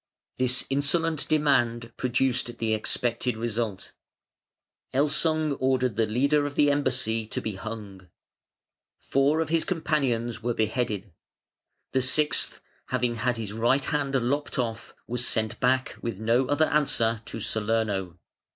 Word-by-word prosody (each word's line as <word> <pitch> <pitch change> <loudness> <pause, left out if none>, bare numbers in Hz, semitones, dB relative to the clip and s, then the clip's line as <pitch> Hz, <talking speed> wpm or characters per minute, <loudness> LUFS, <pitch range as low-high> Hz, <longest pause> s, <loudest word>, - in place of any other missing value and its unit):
This 125 0 +1
insolent 155 +3 +1
demand 120 -6 +2
produced 125 -1 0
the 110 -1 0
expected 115 +2 -1
result. 115 -3 -3 1.0
Elsung 150 +1 +2
ordered 130 -3 +1
the 110 0 +2
leader 140 +6 +2
of 145 - -7
the 145 -1 +4
embassy 130 -6 0
to - - -3
be 110 - -3
hung. 100 -3 -8 0.9
Four 140 +4 +2
of 160 - -2
his 165 0 +2
companions 130 - -1
were 120 0 -1
beheaded. 110 -3 -1 0.8
The 130 - +2
sixth, 150 +3 +2 0.3
having 125 -2 0
had 120 +1 0
his 105 -3 -5
right 120 +5 +2
hand 145 -3 -1
lopped 140 +4 0
off, 115 -3 -3
was 120 0 -1
sent 110 -2 -1
back 130 0 +1
with 115 -5 -4
no 115 +4 +2
other 145 +3 +3
answer 115 -7 +1
to - - -6
Salerno. 105 -4 -1
125 Hz, 135 wpm, -27 LUFS, 115-140 Hz, 1.0 s, the